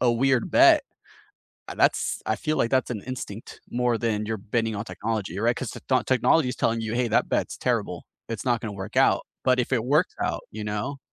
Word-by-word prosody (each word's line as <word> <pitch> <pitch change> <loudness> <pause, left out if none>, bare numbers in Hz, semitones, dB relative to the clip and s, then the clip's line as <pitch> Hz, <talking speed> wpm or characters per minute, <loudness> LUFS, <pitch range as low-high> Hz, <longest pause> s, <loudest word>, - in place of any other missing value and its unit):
a 125 - +4
weird 130 0 +1
bet, - - +6 0.9
a - - -6
that's - - +2
I 110 - +1
feel 155 -1 -2
like 115 - +2
that's 130 -1 +2
an 105 - -4
instinct 120 -4 -7
more 120 -1 +1
than 105 -2 -1
you're 110 0 -2
betting 110 +2 -1
on 100 - -3
technology, 105 -5 -4
right? 120 +2 +2
'Cause 130 -5 -4
the - - -8
techno 130 -1 +1
technology's 130 +1 +2
telling 115 0 +1
you, 110 0 -3
"Hey, 120 0 +1
that - - +1
bet's - - -1
terrible. - - -1 0.2
It's 115 -2 -5
not 120 -3 +1
gonna 110 -2 -5
work 100 +5 -6
out. 135 - +4 0.2
But 130 0 +3
if 120 - -5
it 120 -3 +1
works 150 +7 +2
out" - - -1
you 105 0 -6
know? 105 +7 -3
115 Hz, 215 wpm, -25 LUFS, 110-130 Hz, 0.9 s, bet